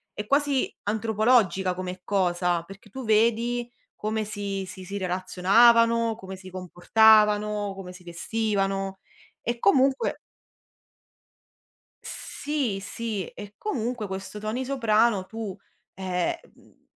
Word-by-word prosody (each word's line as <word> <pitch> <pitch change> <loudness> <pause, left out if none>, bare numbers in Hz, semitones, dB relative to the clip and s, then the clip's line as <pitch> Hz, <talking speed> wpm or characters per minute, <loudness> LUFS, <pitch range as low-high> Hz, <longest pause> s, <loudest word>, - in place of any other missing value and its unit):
è 210 - -4
quasi 280 +1 +1
antropologica 215 -3 +2
come 185 0 -5
cosa, 175 -3 +1
perché 195 +3 -14
tu 260 +3 -7
vedi 235 +2 +2 0.2
come 215 0 -2
si 200 -2 -4
si 185 0 -9
si 195 +2 -5
relazionavano, 225 +5 +4
come 190 -3 -9
si 185 0 -11
comportavano, 210 +2 +3
come 185 -2 -8
si 180 0 -14
vestivano. 195 +1 -1 0.5
E 235 0 -2
comunque 265 +6 +3 1.9
Sì, 280 -9 -3
sì, 210 0 -4
e 205 0 -11
comunque 245 - -3
questo 195 +2 -6
Tony 220 +5 -3
Soprano 230 -6 +2
tu, 220 -3 -6 0.4
eh, 185 - -1
mhmm, - - -25
210 Hz, 110 wpm, -26 LUFS, 190-230 Hz, 1.9 s, relazionavano